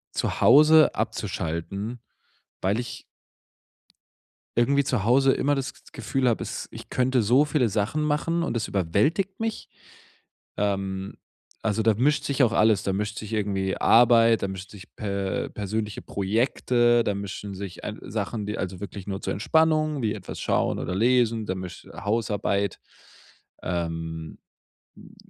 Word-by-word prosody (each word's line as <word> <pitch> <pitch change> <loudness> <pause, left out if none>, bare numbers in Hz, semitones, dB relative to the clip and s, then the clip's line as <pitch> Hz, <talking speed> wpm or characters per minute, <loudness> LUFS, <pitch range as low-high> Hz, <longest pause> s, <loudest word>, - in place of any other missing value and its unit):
zu - - -2
Hause 155 +1 +7
abzuschalten, 100 +9 -3 0.6
weil 100 +4 +1
ich 120 -1 -6 1.6
irgendwie 140 +4 +3
zu 125 -7 -1
Hause 135 +3 +5
immer 145 +2 +1
das 135 -1 -3
G - - -20
Gefühl 125 +2 -1
habe, 115 - +1
es - - -5
ich - - -10
könnte 130 0 +2
so 125 +7 +4
viele 135 -5 +1
Sachen 105 +9 -1
machen, 155 +3 0
und 120 - -1
es 110 - -2
überwältigt 145 - 0
mich. 225 0 -3 0.9
Ähm, 95 -1 -2 0.5
also 110 0 0
da 110 0 +4
mischt 145 +6 +1
sich 140 -1 +1
auch 120 -4 +4
alles. 110 -3 +3
Da 95 - -1
mischt 105 +2 -2
sich 110 0 -7
irgendwie 95 -3 -1
Arbeit, 115 -1 +5
da 100 - 0
mischen 95 0 -7
sich 100 -3 -13
per 100 -4 -2
persönliche 105 +1 -4
Projekte, 120 +3 +1
da 100 - 0
mischen 100 0 -6
sich 95 -1 -7
ei - - -4
Sachen, 110 -3 -3
die 105 - -4
also 95 -1 -4
wirklich 100 -2 -7
nur 95 -1 -4
zur - - -2
Entspannung, 155 +4 +2
wie 110 -2 0
etwas 95 -4 -8
schauen - - 0
oder 90 - -3
lesen, 115 -1 +2
da 95 - -1
misch 90 -1 -8
Hausarbeit. 105 -2 -1 0.8
Ähm, 80 -2 -4 0.6
hm, - - -16
110 Hz, 150 wpm, -25 LUFS, 100-130 Hz, 1.6 s, Hause